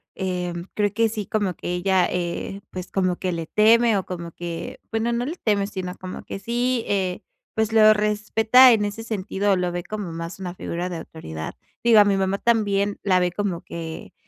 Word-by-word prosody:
Eh, 180 Hz, -2 st, -2 dB, 0.2 s
creo 205 Hz, -1 st, +1 dB
que 225 Hz, +1 st, +2 dB
sí, 215 Hz, -2 st, -4 dB
como 200 Hz, -4 st, -1 dB
que 175 Hz, -, -4 dB
ella, 185 Hz, +1 st, +2 dB
eh, 180 Hz, +2 st, -3 dB
pues, 185 Hz, -1 st, -7 dB
como 185 Hz, -2 st, +1 dB
que 185 Hz, +1 st, -2 dB
le 165 Hz, -2 st, -4 dB
teme, 225 Hz, +2 st, +4 dB
o, 190 Hz, -, -2 dB
como 170 Hz, -2 st, -6 dB
que, 170 Hz, -1 st, -6 dB
bueno 225 Hz, +1 st, 0 dB
no 235 Hz, +1 st, -1 dB
le 310 Hz, +6 st, -4 dB
teme 205 Hz, -7 st, +1 dB
sino 185 Hz, -3 st, -5 dB
como 185 Hz, 0 st, -7 dB
que -, -, -6 dB
sí, 240 Hz, +4 st, -1 dB
eh, 190 Hz, -3 st, -1 dB, 0.3 s
pues, 220 Hz, 0 st, 0 dB
lo 215 Hz, -1 st, +7 dB
respeta 215 Hz, +4 st, +5 dB
en 215 Hz, -3 st, +3 dB
ese 205 Hz, +2 st, -5 dB
sentido, 205 Hz, -2 st, -1 dB
o, -, -, +3 dB
lo 180 Hz, -1 st, -1 dB
ve 175 Hz, 0 st, -4 dB
como 205 Hz, -4 st, -5 dB
más 165 Hz, +1 st, -6 dB
una 180 Hz, -2 st, -5 dB
figura 175 Hz, 0 st, -4 dB
de 175 Hz, -, -4 dB
autoridad. 80 Hz, -, -7 dB, 0.3 s
Digo 230 Hz, -2 st, +7 dB
a 205 Hz, -, +7 dB
mi 200 Hz, -1 st, +3 dB
mamá 195 Hz, 0 st, 0 dB
también 205 Hz, -3 st, +1 dB
la 185 Hz, -2 st, +3 dB
ve 180 Hz, 0 st, +1 dB
como 185 Hz, -2 st, -2 dB
que 165 Hz, -1 st, -7 dB
195 Hz, 205 wpm, -23 LUFS, 180-215 Hz, 0.3 s, lo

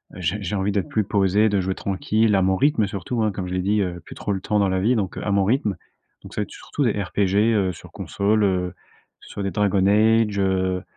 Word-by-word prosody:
j'ai 90 Hz, +4 st, -2 dB
j'ai 100 Hz, +1 st, -3 dB
envie 100 Hz, +1 st, 0 dB
d'être 100 Hz, -2 st, -2 dB
plus 110 Hz, -, +1 dB
posé, 100 Hz, +2 st, +2 dB
de 100 Hz, -1 st, +1 dB
jouer 95 Hz, +1 st, -2 dB
tranquille 105 Hz, +2 st, 0 dB
à 95 Hz, -, +3 dB
mon 95 Hz, 0 st, +2 dB
rythme 110 Hz, -2 st, +2 dB
surtout, 105 Hz, +4 st, -3 dB
hein, 105 Hz, -, +1 dB
comme 95 Hz, -1 st, -5 dB
je 90 Hz, -, -5 dB
l'ai 90 Hz, -, 0 dB
dit, 105 Hz, +2 st, +1 dB
heu, 90 Hz, -2 st, -3 dB
plus -, -, -10 dB
trop 105 Hz, -, -4 dB
le 95 Hz, -, -4 dB
temps 105 Hz, +1 st, 0 dB
dans 100 Hz, -1 st, +2 dB
la 95 Hz, -, 0 dB
vie, 115 Hz, +6 st, +2 dB
donc 95 Hz, -5 st, -2 dB
à 100 Hz, -, -2 dB
mon 100 Hz, -1 st, +3 dB
rythme. 110 Hz, -3 st, +1 dB, 0.5 s
Donc -, -, -11 dB
ça -, -, -2 dB
va -, -, +1 dB
être -, -, -12 dB
surtout 145 Hz, -, -4 dB
des 120 Hz, -, +3 dB
RPG, 100 Hz, 0 st, -1 dB, 0.2 s
heu, 95 Hz, -4 st, +1 dB
sur -, -, -13 dB
console, 105 Hz, +1 st, 0 dB
heu, 90 Hz, -2 st, 0 dB, 0.5 s
sur 100 Hz, -, -7 dB
des 100 Hz, -, -2 dB
Dragon 100 Hz, -1 st, +1 dB
Age, 110 Hz, 0 st, +3 dB
heu, 95 Hz, -1 st, 0 dB
100 Hz, 250 wpm, -22 LUFS, 95-105 Hz, 0.5 s, à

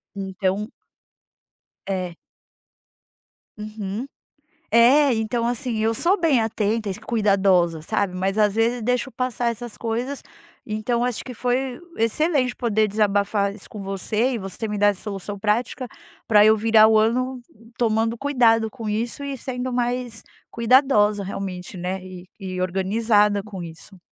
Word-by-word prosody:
Então 195 Hz, +2 st, -2 dB, 1.2 s
É. 185 Hz, -3 st, -3 dB, 1.4 s
Uhum. 210 Hz, +1 st, -5 dB, 0.7 s
É, 250 Hz, +5 st, +5 dB
então 230 Hz, +1 st, -1 dB
assim, 240 Hz, -1 st, -2 dB
eu 220 Hz, +1 st, +1 dB
sou 360 Hz, -, +1 dB
bem 295 Hz, -8 st, +3 dB
atenta 220 Hz, -1 st, -1 dB
e -, -, -1 dB
s 195 Hz, -, -10 dB
cuidadosa, 195 Hz, -7 st, +2 dB
sabe, 185 Hz, +4 st, -1 dB
mas 190 Hz, +2 st, -1 dB
às 210 Hz, -2 st, +3 dB
vezes 230 Hz, +2 st, +1 dB
deixo 250 Hz, +3 st, 0 dB
passar 245 Hz, -1 st, -1 dB
essas 235 Hz, 0 st, -7 dB
coisas. 240 Hz, +5 st, -3 dB, 0.5 s
Então, 225 Hz, +3 st, -1 dB
acho 245 Hz, -3 st, -2 dB
que 255 Hz, -, -7 dB
foi 250 Hz, +2 st, -1 dB, 0.2 s
excelente 255 Hz, +3 st, +1 dB
poder 220 Hz, -3 st, +1 dB
desabafar 205 Hz, -1 st, +1 dB
isso 205 Hz, -, -15 dB
com 210 Hz, -, -7 dB
você 210 Hz, +6 st, -1 dB
e 240 Hz, -, -2 dB
você 195 Hz, +3 st, -5 dB
me 210 Hz, -, -3 dB
dar 205 Hz, 0 st, +4 dB
essa 200 Hz, -2 st, -1 dB
solução 205 Hz, -1 st, -6 dB
prática 225 Hz, +5 st, -1 dB, 0.4 s
pra 210 Hz, -2 st, +6 dB
eu 215 Hz, 0 st, +7 dB
virar 220 Hz, 0 st, +6 dB
o 220 Hz, 0 st, +5 dB
ano 250 Hz, +4 st, +1 dB, 0.4 s
tomando 225 Hz, 0 st, +1 dB
cuidado 230 Hz, -5 st, +3 dB
com 230 Hz, -3 st, -8 dB
isso 230 Hz, +6 st, -2 dB
e 275 Hz, -1 st, -4 dB
sendo 250 Hz, 0 st, -4 dB
mais 245 Hz, -2 st, -2 dB, 0.3 s
cuidadosa 225 Hz, -4 st, +3 dB
realmente, 185 Hz, -1 st, -6 dB
né, 185 Hz, +2 st, -3 dB
e 185 Hz, -1 st, -10 dB
e 185 Hz, -2 st, -5 dB
organizada 205 Hz, +3 st, +2 dB
com 195 Hz, -3 st, -8 dB
isso. 170 Hz, +4 st, -11 dB
220 Hz, 145 wpm, -23 LUFS, 200-245 Hz, 1.4 s, eu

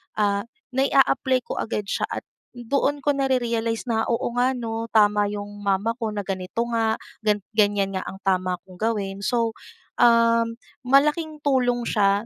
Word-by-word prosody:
ah, 200 Hz, 0 st, 0 dB, 0.2 s
nai-aapply 265 Hz, -1 st, +2 dB
ko -, -, -5 dB
agad 210 Hz, -2 st, -2 dB
siya 195 Hz, -, -2 dB
at -, -, -5 dB, 0.3 s
doon 275 Hz, +4 st, 0 dB
ko 290 Hz, -, +3 dB
narerealize 235 Hz, -4 st, 0 dB
na, 225 Hz, -2 st, 0 dB
"Oo 235 Hz, 0 st, -1 dB
nga 250 Hz, +2 st, +1 dB
ano, 225 Hz, -1 st, -4 dB
tama 210 Hz, -2 st, +3 dB
'yong 205 Hz, 0 st, -6 dB
mama 200 Hz, +3 st, +1 dB
ko, 225 Hz, -, 0 dB
na 205 Hz, -2 st, -4 dB
ganito 190 Hz, +4 st, -2 dB
nga, 225 Hz, -1 st, +1 dB, 0.2 s
gan 210 Hz, -1 st, +2 dB, 0.2 s
ganyan 205 Hz, -2 st, +2 dB
nga 190 Hz, -, -2 dB
ang 190 Hz, -, -8 dB
tama 185 Hz, -1 st, +1 dB
kong 185 Hz, -, -15 dB
gawin." 200 Hz, -3 st, -1 dB
So, 230 Hz, +2 st, 0 dB, 0.5 s
um, 230 Hz, -1 st, +4 dB, 0.2 s
malaking 300 Hz, +4 st, +2 dB
tulong 245 Hz, -3 st, +2 dB
siya, 200 Hz, -1 st, +2 dB
225 Hz, 155 wpm, -24 LUFS, 205-245 Hz, 0.5 s, um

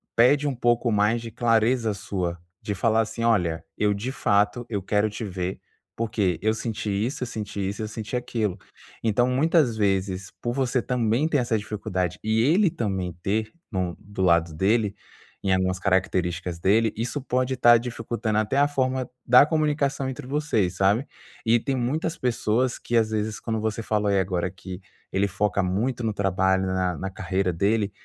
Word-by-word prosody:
pede 140 Hz, +5 st, +4 dB
um 140 Hz, -, -1 dB
pouco 120 Hz, 0 st, +2 dB
mais 105 Hz, +2 st, +2 dB
de 115 Hz, -, -6 dB
clareza 115 Hz, 0 st, +2 dB
sua, 90 Hz, -3 st, -3 dB, 0.2 s
de 105 Hz, -1 st, -3 dB
falar 110 Hz, +4 st, +2 dB
assim: 115 Hz, +1 st, -4 dB
"Olha, 85 Hz, -8 st, +1 dB
eu, 105 Hz, -1 st, +2 dB
de 110 Hz, +6 st, -3 dB
fato, 105 Hz, -1 st, +1 dB
eu 105 Hz, -4 st, -2 dB
quero 105 Hz, +3 st, +1 dB
te 110 Hz, -, -6 dB
ver 95 Hz, -1 st, -4 dB, 0.4 s
porque 105 Hz, -6 st, 0 dB
eu 110 Hz, 0 st, +3 dB
senti 110 Hz, -1 st, -4 dB
isso, 115 Hz, +7 st, -1 dB
eu 125 Hz, -, -3 dB
senti 105 Hz, -4 st, -4 dB
isso, 100 Hz, -, -5 dB
eu -, -, -3 dB
senti 110 Hz, +2 st, -5 dB
aquilo". 110 Hz, -5 st, -1 dB, 0.5 s
Então, 115 Hz, +2 st, +2 dB
muitas 135 Hz, -3 st, +2 dB
vezes 95 Hz, -2 st, 0 dB
por 120 Hz, -, -1 dB
você 130 Hz, -1 st, 0 dB
também 125 Hz, +3 st, +1 dB
ter 150 Hz, -, +2 dB
essa 120 Hz, -2 st, 0 dB
dificuldade 95 Hz, -4 st, -3 dB
e 110 Hz, +1 st, +2 dB
ele 175 Hz, -, +4 dB
também 95 Hz, -, -2 dB
ter 110 Hz, +2 st, -1 dB, 0.2 s
no 90 Hz, -4 st, -2 dB
do 100 Hz, -1 st, -7 dB
lado 85 Hz, -2 st, +3 dB
dele, 105 Hz, +5 st, +1 dB, 0.5 s
em 95 Hz, -1 st, +2 dB
algumas 95 Hz, 0 st, +1 dB
características 90 Hz, -2 st, 0 dB
dele, 110 Hz, +5 st, +3 dB
isso 120 Hz, +6 st, -2 dB
pode 130 Hz, 0 st, 0 dB
estar 120 Hz, -1 st, +7 dB
dificultando 115 Hz, -2 st, -2 dB
até 110 Hz, +5 st, 0 dB
a 140 Hz, -, +5 dB
forma 130 Hz, -2 st, -1 dB, 0.2 s
da 125 Hz, +3 st, +7 dB
comunicação 145 Hz, -3 st, 0 dB
entre 125 Hz, -1 st, -7 dB
vocês, 130 Hz, -11 st, 0 dB
sabe. 100 Hz, +8 st, +3 dB, 0.4 s
E 115 Hz, +1 st, +4 dB
tem 135 Hz, +3 st, -2 dB
muitas 140 Hz, +6 st, -1 dB
pessoas 120 Hz, 0 st, 0 dB
que 120 Hz, -, -3 dB
às 110 Hz, -1 st, +3 dB
vezes 110 Hz, 0 st, -2 dB
quando 110 Hz, -1 st, -2 dB
você 110 Hz, +1 st, -2 dB
falou 105 Hz, -1 st, 0 dB
aí 100 Hz, -1 st, +3 dB
agora 90 Hz, -1 st, -1 dB
que 95 Hz, 0 st, -9 dB, 0.3 s
ele 100 Hz, +1 st, +1 dB
foca 100 Hz, +1 st, 0 dB
muito 115 Hz, +7 st, -1 dB
no 110 Hz, -2 st, 0 dB
trabalho, 95 Hz, -1 st, +1 dB
na 95 Hz, -2 st, 0 dB
na 95 Hz, -, -4 dB
carreira 95 Hz, 0 st, -1 dB
dele, 100 Hz, +4 st, +1 dB
110 Hz, 180 wpm, -25 LUFS, 95-120 Hz, 0.5 s, estar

